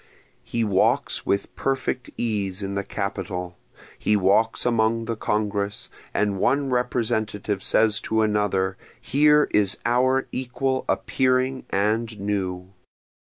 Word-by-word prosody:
He 115 Hz, -, -2 dB
walks 100 Hz, -3 st, +1 dB
with 100 Hz, 0 st, -1 dB
perfect 135 Hz, -1 st, -2 dB
ease 100 Hz, -4 st, -2 dB
in 100 Hz, 0 st, -3 dB
the 100 Hz, 0 st, -2 dB
capitol, 90 Hz, -3 st, -4 dB, 0.4 s
He 105 Hz, -, +2 dB
walks 105 Hz, +3 st, +2 dB
among 115 Hz, -1 st, +1 dB
the 115 Hz, 0 st, -2 dB
Congress, 105 Hz, -1 st, -2 dB, 0.2 s
and 100 Hz, -2 st, 0 dB
one 140 Hz, +5 st, +1 dB
Representative 110 Hz, -5 st, -1 dB
says 110 Hz, +1 st, +3 dB
to 110 Hz, 0 st, +1 dB
another, 100 Hz, -3 st, 0 dB, 0.2 s
Here 150 Hz, +4 st, +4 dB
is 100 Hz, -2 st, +2 dB
our 130 Hz, +3 st, +2 dB
equal 130 Hz, +1 st, -2 dB
appearing 130 Hz, 0 st, +1 dB
and 110 Hz, +2 st, 0 dB
new. 95 Hz, -2 st, -3 dB
110 Hz, 115 wpm, -24 LUFS, 100-125 Hz, 0.4 s, Here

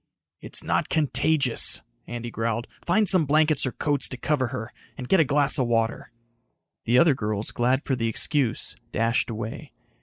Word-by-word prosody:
"It's -, -, -4 dB
not -, -, 0 dB
contagious," 150 Hz, -4 st, +1 dB, 0.2 s
Andy 120 Hz, 0 st, -6 dB
growled. 115 Hz, +1 st, -2 dB, 0.2 s
"Find 205 Hz, +5 st, +2 dB
some 170 Hz, -5 st, +2 dB
blankets 155 Hz, -1 st, +3 dB
or -, -, -2 dB
coats 145 Hz, 0 st, 0 dB
to 130 Hz, -, -6 dB
cover 135 Hz, -2 st, 0 dB
her. 120 Hz, -1 st, -6 dB, 0.2 s
And 125 Hz, -, -6 dB
get 190 Hz, -, +4 dB
a -, -, +6 dB
glass 145 Hz, +1 st, +2 dB
of 125 Hz, -, +1 dB
water." 115 Hz, -1 st, -1 dB, 0.7 s
The 120 Hz, +2 st, +3 dB
other 160 Hz, +1 st, +6 dB
girls, 105 Hz, -4 st, -2 dB
glad 130 Hz, +3 st, +1 dB
for 135 Hz, -, -1 dB
the 115 Hz, -2 st, -1 dB
excuse, 125 Hz, +2 st, 0 dB, 0.2 s
dashed 115 Hz, +3 st, +1 dB
away. 110 Hz, 0 st, -6 dB
130 Hz, 170 wpm, -25 LUFS, 115-150 Hz, 0.7 s, a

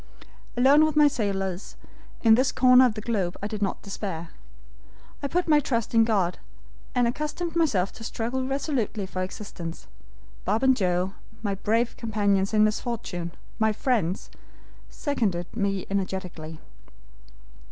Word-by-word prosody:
Alone 275 Hz, +5 st, +6 dB
with 310 Hz, -1 st, +1 dB
my 300 Hz, -1 st, +7 dB
sailors, 195 Hz, -7 st, -2 dB, 0.5 s
in 225 Hz, -1 st, +7 dB
this 255 Hz, +3 st, +4 dB
corner 255 Hz, 0 st, +6 dB
of 220 Hz, -, -3 dB
the 215 Hz, -, -4 dB
globe, 200 Hz, -6 st, -1 dB
I -, -, 0 dB
did 210 Hz, -1 st, -5 dB
not 195 Hz, -, -1 dB
despair. 190 Hz, -5 st, -5 dB, 0.9 s
I 285 Hz, -, -1 dB
put 350 Hz, +4 st, 0 dB
my 300 Hz, -2 st, +6 dB
trust 235 Hz, -6 st, -1 dB
in 225 Hz, -1 st, +6 dB
God, 195 Hz, -6 st, +1 dB, 0.6 s
and 245 Hz, -1 st, +3 dB
accustomed 305 Hz, +6 st, -3 dB
myself 220 Hz, -, +2 dB
to -, -, -11 dB
struggle 235 Hz, +3 st, -2 dB
resolutely 265 Hz, -6 st, -1 dB
for 185 Hz, 0 st, -4 dB
existence. 185 Hz, -3 st, -6 dB, 0.6 s
Bob 215 Hz, +6 st, 0 dB
and 260 Hz, -1 st, +5 dB
Joe, 185 Hz, -2 st, 0 dB, 0.3 s
my 200 Hz, -2 st, 0 dB
brave 225 Hz, +4 st, 0 dB
companions 205 Hz, -4 st, +1 dB
in 215 Hz, -1 st, +4 dB
misfortune, 215 Hz, -5 st, -2 dB, 0.3 s
my 220 Hz, 0 st, +3 dB
friends, 210 Hz, -5 st, -1 dB, 0.6 s
seconded 205 Hz, -, -1 dB
me 200 Hz, -3 st, -1 dB
energetically. 185 Hz, -5 st, -4 dB
215 Hz, 140 wpm, -26 LUFS, 190-255 Hz, 0.9 s, my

